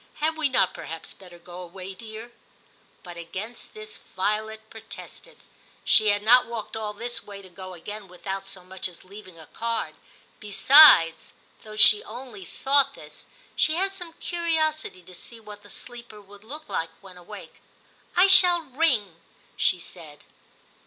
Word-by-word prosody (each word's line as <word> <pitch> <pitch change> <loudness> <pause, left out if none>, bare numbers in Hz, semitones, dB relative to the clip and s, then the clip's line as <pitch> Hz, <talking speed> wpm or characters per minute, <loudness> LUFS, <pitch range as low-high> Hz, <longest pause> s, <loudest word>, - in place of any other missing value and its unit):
* - - -35
Had 315 +1 -1
we 315 -3 0
not 245 -8 +2
perhaps 165 0 -8
better 180 -2 -15
go 175 +1 -11
away, 185 +2 -9
dear 220 +3 -10 0.4
?' - - -35
But 175 -2 -11
against 190 - -8
this 430 0 -8
Violet 215 +3 -4
protested; 225 - -11 0.5
she 215 - +5
had 205 0 +1
not 245 +3 +5
walked 230 -3 -7
all 215 -1 -4
this 240 +3 -5
way, 200 -1 -11
to 185 - -13
go 185 +1 -10
again 205 +4 -9
without 190 +2 -7
so 190 -2 -8
much 185 +1 -5
as 175 - -15
leaving 185 -2 -13
a 160 - -13
card; 230 +5 -3 0.5
besides 210 - +6 0.3
(though 215 -1 -11
she 215 0 +8
only 230 -4 -10
thought 275 +6 +2
this), - - -13 0.3
she 310 +1 +2
had 385 +3 0
some 355 -4 -7
curiosity 315 - -2
to 185 +1 -15
see 230 +6 -9
what 210 -2 -12
the 205 - -17
sleeper 240 -3 -10
would 205 0 -17
look 300 +7 -9
like 165 - -3
when 190 -2 -14
awake. 175 -1 -13 0.3
* - - -32
I 365 - +7
shall 360 -3 +7
ring,' 255 - +1 0.4
she 180 - +1
said. 160 -4 -12
215 Hz, 165 wpm, -25 LUFS, 185-260 Hz, 0.5 s, she